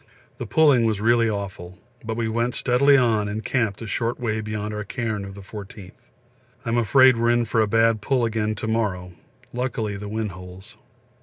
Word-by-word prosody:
The - - -5
pulling 145 -7 +4
was 110 -3 0
really 115 +1 +3
awful, 95 -3 -6 0.3
but 110 0 -4
we 115 -1 -1
went 115 +2 -1
steadily 140 +3 +4
on 110 -5 +2
and 105 +2 -5
camped 115 -5 -1
a - - -6
short 115 +2 -2
way 110 -3 -2
beyond 105 0 -4
our 105 0 -4
cairn 110 -1 -3
of 95 0 -9
the 100 - -10
14th. 100 -1 -10 0.7
I'm 115 +1 0
afraid 130 +2 +5
we - - -2
are - - +3
in 120 0 +2
for 115 0 +1
a 110 - +2
bad 115 0 +2
pull 125 +1 +1
again 110 -1 -1
to 110 - -5
morrow, 100 -5 -1 0.4
luckily 115 -5 -3
the 105 +1 -7
wind 110 -1 -3
holds. 90 +2 -12
110 Hz, 200 wpm, -23 LUFS, 105-120 Hz, 0.7 s, afraid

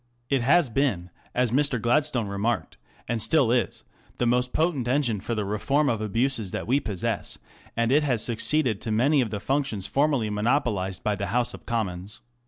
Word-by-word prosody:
It 135 -2 +2
has 155 +5 +4
been, 110 -10 0 0.2
as 125 -2 +1
Mr. 135 -1 +2
Gladstone 120 +1 +1
remarked, 100 +3 -2 0.3
and 115 -1 -1
still 140 -2 +3
is, 120 -1 0 0.3
the 120 - 0
most 125 +1 +1
potent 155 -7 0
engine 125 -6 +1
for 115 - -3
the 105 -2 -2
reform 135 +9 +1
of 115 -3 -1
abuses 115 0 0
that - - -4
we 130 +5 +2
possess, 100 -9 -3 0.4
and 115 +1 +1
it 145 +3 +5
has 125 -7 +1
succeeded 120 -1 +1
to 110 - -3
many 135 +6 +3
of 120 - -1
the 105 - -4
functions 135 -5 -1
formerly 135 -4 +1
monopolized 105 -4 0
by 105 - +1
the 100 -1 -3
House 120 +4 +1
of - - -12
Commons. 100 -3 -3
120 Hz, 185 wpm, -25 LUFS, 105-135 Hz, 0.4 s, it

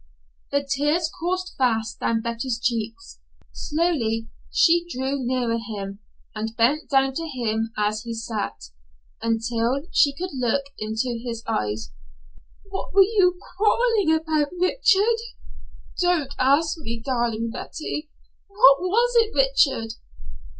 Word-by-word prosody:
The 280 0 0
tears 295 +4 0
coursed 365 +2 -2
fast 225 -4 0
down 225 -1 0
Betty's 235 +1 -2
cheeks. 230 - -3 0.3
Slowly 260 -9 -1 0.2
she 340 0 +4
drew 265 -1 -2
nearer 240 -2 0
him, 200 -3 -6 0.3
and 220 +1 -5
bent 280 +7 +2
down 270 -1 +3
to 330 +4 -4
him 225 -5 -2
as 210 +1 0
he 230 0 -5
sat, 220 - -4 0.6
until 230 +3 0
she 280 -1 +4
could 365 +5 -4
look 255 +1 0 0.2
into 225 +3 -2
his 230 -2 -5
eyes. 105 +1 -2 0.8
"What 390 - -5
were 395 - +9
you 380 -3 +3 0.2
quarreling 420 -6 +3
about, 310 -2 0
Richard?" 435 +4 +3 0.8
"Don't 350 -7 +1
ask 290 +5 +3
me, 230 -6 -5
darling 230 -2 -1
Betty." 305 +3 -5 0.4
"What 330 -9 +6
was 460 +7 +2
it, 450 -1 +4
Richard?" 305 - +2
270 Hz, 120 wpm, -24 LUFS, 230-340 Hz, 0.8 s, were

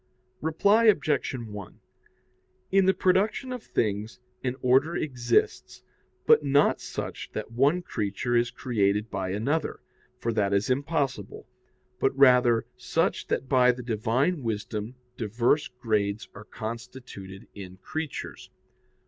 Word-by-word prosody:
Reply 200 +8 +3
Obj. 150 - +2
1: 105 -5 -8 0.9
In 195 0 +4
the 190 - +5
production 205 +8 +1
of 250 - -6
things 110 - -2 0.2
an 125 -1 -1
order 135 +7 +3
exists, 120 -7 0 0.4
but - - +6
not 140 0 +3
such - - -6
that 110 +1 -5
one 140 +9 +2
creature 105 - -2
is 120 0 +3
created 105 -2 0
by 95 -1 -3
another, 115 +12 -1 0.4
for 115 -1 -2
that 100 -2 +1
is 100 +5 +1
impossible; 140 +1 -2 0.5
but 135 - +1
rather 125 -4 +5
such - - -1
that 130 - -1
by 125 -1 +5
the 125 0 -7
Divine 120 - 0
wisdom 110 0 -4 0.2
diverse 120 +6 +1
grades 110 -4 -2
are 105 - -11
constituted 115 -4 -8
in 95 -2 -10
creatures. 155 +9 -6
125 Hz, 125 wpm, -27 LUFS, 105-140 Hz, 0.9 s, but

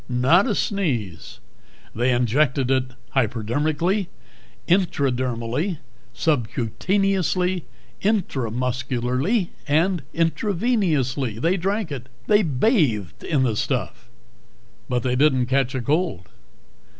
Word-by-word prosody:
Not 130 - +4
a 215 - 0
sneeze. 120 - -2 0.5
They 120 +3 +1
injected 125 +2 +2
it 130 -1 +2 0.3
hypodermically, 145 - 0 0.6
intradermally, 135 - 0 0.4
subcutaneously, 180 - 0 0.4
intramuscularly, 130 - 0 0.2
and 165 +4 +2
intravenously. 165 - 0
They 170 +8 +2
drank 195 0 -1
it. 130 -2 -6 0.2
They 210 0 +4
bathed 135 - +1
in 145 -5 +1
the 115 -4 +1
stuff. 120 -1 -3 0.8
But 125 -2 0
they 125 -1 0
didn't 130 -2 +3
catch 135 +1 0
a 130 - -1
cold. 145 - -1
140 Hz, 90 wpm, -23 LUFS, 125-180 Hz, 0.8 s, Not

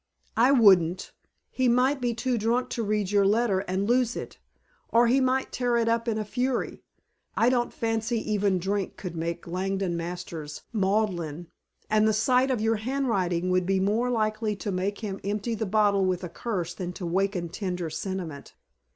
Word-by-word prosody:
"I 245 +4 +5
wouldn't. 190 -8 +4 0.4
He 260 -1 +1
might 255 +3 +3
be 240 -2 0
too 245 +2 -1
drunk 235 +4 0
to 235 - -2
read 210 -2 -1
your 205 -1 +4
letter, 205 0 +2
and 190 +1 -2
lose 245 0 +2
it. - - -7 0.5
Or 235 +1 +5
he 255 +3 +3
might 260 0 +1
tear 245 -1 0
it 230 -1 +1
up 230 +1 +1
in 225 -2 0
a 215 - -2
fury. 250 +3 -2 0.6
I 235 - +4
don't 245 -1 +1
fancy 225 +1 -1
even 200 -2 +2
drink 195 +2 -2
could 180 -3 -6
make 170 +1 -3
Langdon 190 +1 -2
Masters 170 -3 -6
maudlin, 190 -6 -1 0.4
and 215 0 +3
the 215 - +3
sight 250 +4 +3
of 255 -4 0
your 225 +1 +1
handwriting 200 -8 0
would 180 0 +1
be 195 0 +2
more 215 +6 +1
likely 215 -2 0
to 205 +1 -4
make 195 +3 -2
him 200 -3 -4
empty 210 +4 -2
the 220 -1 -2
bottle 205 -1 +3
with 185 0 -1
a 180 - -4
curse 180 -5 -3
than 180 0 -5
to 180 - -8
awaken 180 0 -1
tender 180 -2 -4
sentiment. 175 -8 -5
205 Hz, 180 wpm, -27 LUFS, 185-235 Hz, 0.6 s, I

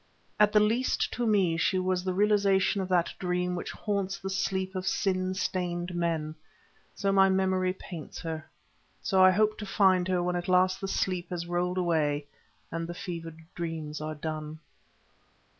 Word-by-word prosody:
At 210 0 +6
the 210 - +5
least 225 +5 +1
to 240 -1 -1
me 190 -6 +3
she 185 +3 +2
was 185 0 0
the 185 0 -1
realization 200 -1 +3
of 185 - -4
that 175 -2 +2
dream 180 0 -1
which 175 - -4
haunts 200 -2 -2
the 195 0 -5
sleep 190 0 -1
of 185 0 -4
sin 185 -1 0
stained 180 -2 -2
men; 165 -3 -1 0.6
so 200 -1 0
my 195 0 +5
memory 190 -1 +2
paints 170 -4 -9
her, 160 -2 -5 0.5
so 190 -2 +4
I 185 - +9
hope 215 +3 +2
to 210 - -5
find 190 -2 +3
her 180 -1 +1
when 180 0 0
at 175 0 -3
last 185 0 +3
the 195 - -2
sleep 185 -2 -1
has 175 -1 -4
rolled 175 +1 -1
away 155 -5 +1 0.5
and 165 0 -3
the 175 - -6
fevered 165 -3 -6
dreams 160 -3 -4
are 155 0 -4
done. 155 0 -5
185 Hz, 175 wpm, -29 LUFS, 170-190 Hz, 0.6 s, I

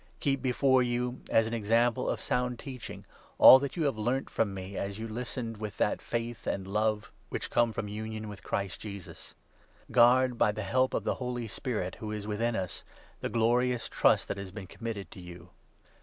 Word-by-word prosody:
Keep 135 -2 0
before 130 +1 +3
you, 125 +1 -1
as 115 - +4
an 110 - -4
13 - - -4
example 115 +3 +2
of - - -1
sound 125 -1 -1
teaching, 130 -2 -8 0.3
all 130 - +11
that 140 +5 -4
you 160 -3 +2
learnt 120 +4 -2
from 110 -3 +1
me 95 0 -7
as 100 +1 -3
you 115 +1 -5
listened 115 0 -4
with 105 -1 -6
that - - +1
faith 115 0 -4
and 95 - -1
love 105 +2 0 0.2
which - - -4
come 120 -1 +3
from 105 - -4
union 110 +1 -5
with 105 -2 -9
Christ 100 -3 -3
Jesus. 100 -5 -9 0.6
Guard 125 0 +5
by 105 - +4
the 110 0 -4
help 130 +6 +1
of - - -1
the - - +1
Holy 125 -2 -3
Spirit, 105 -5 -3
who 110 -1 -5
is 105 -1 -4
14 105 - -6
within 115 +2 0
us, 95 -3 -4 0.4
the - - -3
glorious 120 +1 +2
trust - - +3
that - - -2
has 100 -1 -6
been 95 +1 -8
committed 110 0 -6
to - - -10
you. 90 -1 -11
115 Hz, 200 wpm, -30 LUFS, 105-125 Hz, 0.6 s, all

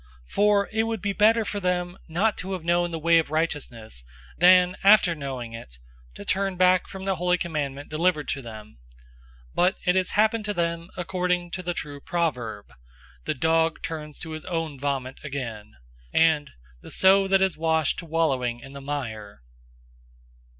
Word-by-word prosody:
002:021 - - -17
For 205 -1 +3
it 220 0 +1
would 225 -3 -3
be 200 -1 0
better 220 +2 +4
for 205 - -3
them 180 -1 -1
not 195 +6 +1
to 190 +1 -4
have 180 -3 -5
known 175 +1 +2
the 165 - -4
way 165 +1 +4
of 160 - -2
righteousness, 135 - -3 0.3
than, 180 +1 +6
after 195 -3 +6
knowing 130 -6 -6
it, 65 - -10 0.4
to 100 - -9
turn 195 -1 0
back 185 0 +4
from 190 0 -8
the 195 -1 -1
holy 180 +1 +2
commandment 145 -5 -3
delivered 155 -1 +1
to 135 - -2
them. 110 - -11 0.7
002:022 - - -26
But 180 +3 +2
it 180 - +4
has 185 -1 +2
happened 215 +1 +2
to 205 -1 -2
them 170 0 -2
according 180 -1 -1
to 185 - -4
the 175 -1 -3
true 145 -1 -6
proverb, 120 - -3 0.5
"The - - -1
dog 160 +3 +1
turns 150 -2 -6
to 160 - -6
his 155 0 -6
own 165 -6 -3
vomit 135 -2 -3
again,"{Proverbs 105 - -8
26:11} - - +5
and 150 -2 -4 0.3
"the - - -12
sow 195 +1 +4
that 195 0 +3
has 190 -2 +2
washed 160 -2 +1
to 170 - -9
wallowing 135 -7 0
in 135 +2 -12
the 140 - -8
mire." 110 - -5
165 Hz, 180 wpm, -25 LUFS, 140-185 Hz, 0.7 s, than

